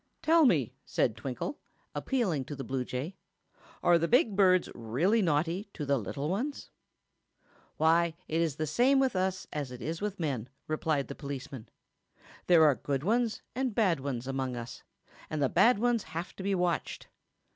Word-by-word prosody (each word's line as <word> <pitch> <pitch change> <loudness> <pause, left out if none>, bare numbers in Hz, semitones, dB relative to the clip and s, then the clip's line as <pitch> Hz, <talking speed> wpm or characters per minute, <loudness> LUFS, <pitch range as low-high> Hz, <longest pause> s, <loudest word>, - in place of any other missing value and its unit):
"Tell 325 0 +5
me," 140 - +2
said 110 - 0
Twinkle, 135 - -5 0.3
appealing 190 - -1
to 145 - -6
the 135 - -6
bluejay; 130 +5 -3 0.7
"are 175 -1 +5
the 170 - +1
big 235 - +3
birds 185 -2 +4
really 150 - +1
naughty 170 +4 0
to 150 - -4
the 140 -1 +2
little 140 +8 -4
ones?" 245 - -3 1.1
"Why, 165 +1 +3
it 160 +1 0
is 160 -4 0
the 155 - -2
same 250 - +3
with 265 -5 +1
us 185 0 -1
as 145 -4 -3
it 125 - -8
is 160 +5 -4
with 205 -2 -3
men," 130 -7 -2 0.2
replied 155 -2 0
the - - -6
policeman. 135 -4 -7 0.8
"There 170 -3 +7
are 150 - +6
good 135 +1 -3
ones 230 +3 0
and 255 -3 -2
bad 185 -9 +3
ones 130 -3 -4
among 135 -1 -2
us, 120 0 -7 0.5
and 155 - -3
the 135 -2 +2
bad 245 -2 +5
ones 235 +1 +2
have 170 -1 -6
to - - -6
be 195 +1 0
watched. 175 -2 -1
165 Hz, 170 wpm, -30 LUFS, 140-200 Hz, 1.1 s, There